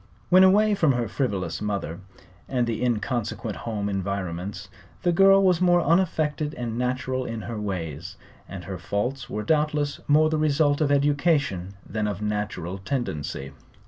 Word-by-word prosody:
When 185 +1 +7
away 210 +3 +5
from 160 -8 +3
her 120 -2 -1
frivolous 95 - -2
mother 100 -6 -3 0.5
and 125 -2 +1
the 115 0 -2
inconsequent 115 -2 -2
home 105 -3 -3
environments 95 -1 -3 0.4
the 175 - +3
girl 195 +2 +6
was 180 -2 +3
more 175 -1 +4
unaffected 155 -3 +1
and 120 -2 -4
natural 130 +1 -1
in 115 -2 -5
her 115 -3 -5
ways, 85 -5 -4 0.3
and 95 0 -7
her 95 0 -6
faults 120 +8 -3
were 105 - -3
doubtless 150 0 0
more 155 +2 +4
the 155 - +1
result 150 -1 +2
of 145 -2 +2
education 140 - +1
than 110 -1 -2
of 100 -2 -3
natural 105 -3 -3
tendency. 80 - -3
120 Hz, 150 wpm, -25 LUFS, 100-150 Hz, 0.5 s, When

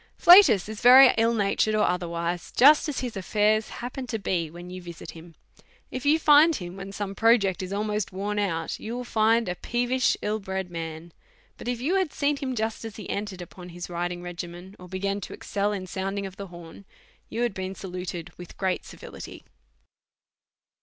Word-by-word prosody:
Flatus 330 - +7
is 215 -1 -7
very 255 +2 +9
ill 230 +1 +2
natured, 210 +1 +1
or 215 - +3
otherwise, 170 -1 -2
just 295 +4 +6
as 280 - -3
his 245 -3 -4
affairs 210 +3 +1
happen 250 +2 -6
to 225 - -2
be 175 -6 -2
when 175 +2 -10
you 185 0 -7
visit 170 -1 -9
him; 165 0 -14 0.6
if 255 +2 -4
you 305 +2 +5
find 305 +1 +6
him 175 -4 -7
when 195 0 -8
some 195 0 -4
project 205 -4 +3
is 185 0 -6
almost 210 0 -2
worn 205 +2 -3
out, 165 -5 -2
you 230 +2 -5
will 250 - -4
find 225 0 +2
a 180 - -1
peevish, 245 +6 0
ill 215 +1 -1
bred 190 -2 -5
man; 165 0 -7 0.4
but - - -10
if 245 -1 -2
you 325 +10 +1
had 370 -6 0
seen 290 +1 +1
him 265 -3 -3
just 220 0 -3
as 225 -2 -7
he 210 - -8
entered 200 -3 -4
upon 180 +1 -12
his 175 +1 -8
riding 175 0 -3
regimen, 175 +2 -8
or 180 - -11
begun 195 +2 -3
to - - -7
excel 205 0 -2
in 195 -3 -4
sounding 195 +1 -3
of 190 -1 -8
the 200 0 -7
horn, 175 +1 -12 0.5
you 235 - -2
had 240 - 0
been 190 0 -5
saluted 180 -2 -6
with 175 - -11
great 190 -2 -1
civility. - - -10
200 Hz, 195 wpm, -26 LUFS, 180-230 Hz, 0.6 s, very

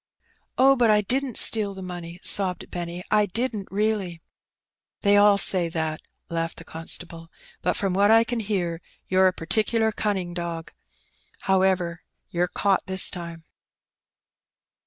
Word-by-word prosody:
"Oh, 270 +1 +5
but 240 -3 +2
I 210 -1 +4
didn't 255 +3 -2
steal 205 -3 +5
the 190 - -8
money/' 175 -1 -8
sobbed 190 -3 +1
Benny, 175 0 -5
"I 210 -1 +3
didn't 220 0 -3
reaUy." 200 -4 -2 0.8
"They 200 0 +3
all 205 0 +5
say 180 -3 +5
that/' 160 -1 -3 0.3
laughed 165 0 -4
the - - -9
constable; 165 0 -7 0.3
"but - - 0
from 195 -2 -1
what 200 +2 +3
I 225 +1 +6
can 235 +1 -3
hear, 180 -6 -3 0.3
you're 190 0 +4
a - - +3
particular 220 +6 0
cunning 195 -5 -3
dog. 170 -2 -6 0.7
However, 185 -3 0 0.3
you're 175 +1 0
caught 195 +1 0
this 190 0 +1
time." 170 -2 -8
190 Hz, 140 wpm, -24 LUFS, 170-210 Hz, 0.8 s, I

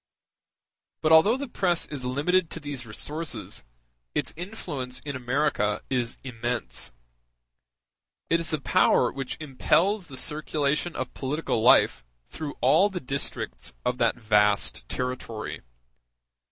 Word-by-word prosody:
But 155 - +3
although 165 +10 +7
the 280 +1 -4
press 180 -7 +1
is 145 -4 -6
limited 155 +7 +1
to - - -5
these 140 -5 -6
resources, 150 +9 -4 0.5
its - - -1
influence 155 - -4
in 140 -2 -5
America 125 -4 0
is 120 -3 0
immense. 120 - -2 1.4
It 165 - +3
is 165 - -3
the 155 - 0
power 125 -2 +3
which 135 -2 -5
impels 170 +7 +1
the 130 - -9
circulation 150 +2 0
of 130 - -4
political 140 -3 -1
life 65 - +5 0.3
through 150 -2 -5
all 200 +2 +5
the 190 -3 -4
districts 135 - -3
of 125 0 0
that 115 -1 +3
vast 105 - +2
territory. 125 -3 -4
140 Hz, 125 wpm, -27 LUFS, 125-160 Hz, 1.4 s, although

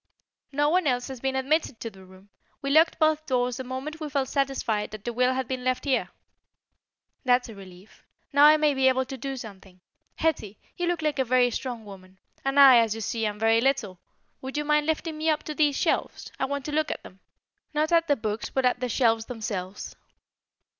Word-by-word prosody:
"No 290 +1 +2
one 355 0 +2
else 245 -1 0
has 265 -2 -7
been 265 +1 -2
admitted 275 -1 0
to 230 - -5
the 190 -1 -15
room. 190 +2 -18 0.3
We 275 - -1
locked 320 +3 +4
both 310 0 +2
doors 250 -2 0
the 260 - -5
moment 260 +5 -6
we 305 -2 -5
felt 275 -2 -1
satisfied 265 -7 -1
that 215 -1 -10
the 240 - -3
will 250 +2 +2
had 260 -2 -2
been 255 -1 -4
left 255 +2 -1
here." 265 -3 0 1.1
"That's 250 -2 +2
a - - -8
relief. 190 0 -15 0.3
Now 285 +1 +7
I 305 +1 +8
may 300 -1 +2
be 265 -1 +2
able 260 0 +2
to 270 - -7
do 270 +1 -5
something. 195 -5 -11 0.4
Hetty, 220 -11 -1 0.2
you 350 - -2
look 345 -2 -1
like 300 -2 -1
a - - +4
very 250 0 +3
strong 240 -3 -5
woman, 190 -2 -13 0.3
and 270 +1 +1
I, 265 -3 +9
as 225 -2 +1
you 225 - -6
see, 225 +1 -1
am 210 0 -4
very 225 +1 +3
little. 235 -9 0 0.4
Would 265 +2 -6
you 295 - -1
mind 300 0 +2
lifting 320 0 -2
me 320 +1 +1
up 305 -1 0
to 305 - -5
these 295 -2 +2
shelves? - - -1
I - - +1
want 280 0 -4
to 300 - -4
look 305 0 0
at - - -5
them. 185 - -14 0.5
Not 310 +1 0
at 335 -1 +3
the 290 - +3
books, 215 -2 -4
but 265 -1 0
at 250 0 +2
the 250 0 -2
shelves 225 -1 +1
themselves." 205 -5 -5
260 Hz, 220 wpm, -26 LUFS, 225-290 Hz, 1.1 s, I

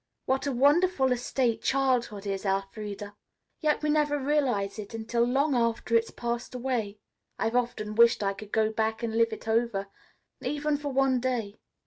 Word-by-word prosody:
What 265 +2 0
a - - +1
wonderful 285 +2 +3
estate 245 -1 0
childhood 250 -6 0
is, 195 -1 -3
Elfreda. 200 +1 -3 0.4
Yet 305 -1 +1
we 300 - +2
never 295 -1 +2
realize 260 -8 0
it 210 +2 -7
until 225 +1 -1
long 275 +5 +2
after 230 -1 0
it 230 0 +5
has - - -11
passed 240 +1 -3
away. 240 -5 -2 0.4
I've 225 - -1
often 235 -4 -1
wished 230 -1 +5
I 195 0 +1
could 205 +1 -11
go 220 0 +2
back 220 +1 -1
and 225 -1 -2
live 230 0 +3
it 220 - -8
over, 220 -3 0 0.5
even 295 0 -1
for 290 -1 -4
one 265 -1 +2
day." 240 -5 -2
235 Hz, 170 wpm, -28 LUFS, 215-265 Hz, 0.5 s, it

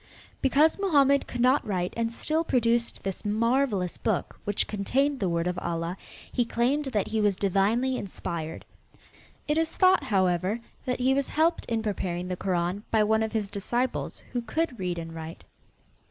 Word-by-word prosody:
Because 295 +6 +4
Mohammed 280 -8 +3
could 245 - -4
not 255 +3 +4
write 185 -3 -2
and 230 0 -1
still 310 +7 -1
produced 235 -5 +1
this 195 -1 -4
marvelous 220 -3 +1
book, - - -1
which 205 0 +1
contained 270 +7 0
the 190 - 0
word 170 0 0
of 180 0 -1
Allah, 170 0 -2 0.4
he 245 - +2
claimed 250 +6 0
that 215 -8 -1
he 220 0 0
was 205 -2 +3
divinely 210 +7 +1
inspired. 165 -4 -5 0.8
It 300 +1 +2
is 325 0 0
thought, 370 0 +5
however, 185 +1 +1 0.3
that 250 - 0
he 260 +1 +4
was 275 0 0
helped 330 +2 +1
in 225 -2 -1
preparing 180 -4 -2
the 180 - -1
Koran 180 +1 -1
by 220 -1 +3
one 220 +1 +2
of 220 0 -2
his 215 -3 0
disciples 230 +5 -2
who 245 - -1
could 285 0 -2
read 180 -2 -2
and 165 -1 -6
write. 165 +1 -8
220 Hz, 170 wpm, -27 LUFS, 185-260 Hz, 0.8 s, thought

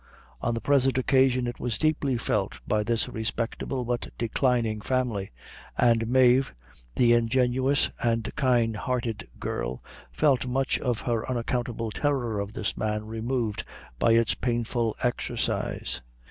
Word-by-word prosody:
On 120 0 0
the 115 - -3
present 135 -2 +3
occasion 130 -1 +3
it 120 0 -4
was 120 -3 -2
deeply 145 -4 +1
felt 105 -4 -1
by 105 0 +2
this 115 +1 0
respectable 115 +3 -3
but 120 0 -2
declining 115 -2 +1
family, 120 -6 -1 0.5
and 115 -2 +3
Mave, 130 - +4 0.4
the 120 -1 +5
ingenuous 125 +4 +2
and 115 -3 0
kind 120 -4 +2
hearted 120 -1 -2
girl, - - -3 0.3
felt 135 -5 +2
much 135 +2 0
of 120 -3 -1
her 115 0 -1
unaccountable 120 -2 -2
horror 125 -7 0
of 100 +1 -4
this 105 -3 -2
man 105 0 -2
removed 115 0 -2 0.4
by 115 - +4
its 115 -1 +3
painful 120 -2 -1
exercise. 120 - -2
120 Hz, 130 wpm, -27 LUFS, 110-130 Hz, 0.5 s, the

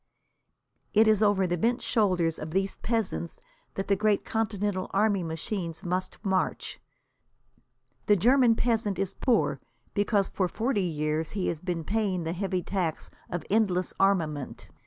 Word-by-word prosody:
It 220 +1 +6
is 215 -1 +4
over 205 -3 +3
the 175 -1 -1
bent 235 +6 +2
shoulders 180 -8 +1
of 155 - -5
these 195 +4 0
peasants 220 -7 -2 0.4
that 195 - -3
the 200 - +3
great 210 +1 +1
Continental 205 -4 -1
army 205 -1 +3
machines 165 +1 -4
must 180 +1 -2
march. 190 -1 -1 1.3
The 210 - +6
German 240 +4 +4
peasant 225 -5 0
is 195 0 -2
poor, 245 -3 +1 0.3
because 205 -1 +2
for 185 - -1
forty 225 +3 -1
years 155 -2 -1
he 195 -3 -1
has 165 - -3
been 175 -1 -3
paying 200 -3 -1
the 165 +1 -2
heavy 185 -1 -2
tax 175 -5 -2 0.2
of 175 - -4
endless 195 -4 +1
armament. 160 -8 0
195 Hz, 145 wpm, -28 LUFS, 175-215 Hz, 1.3 s, It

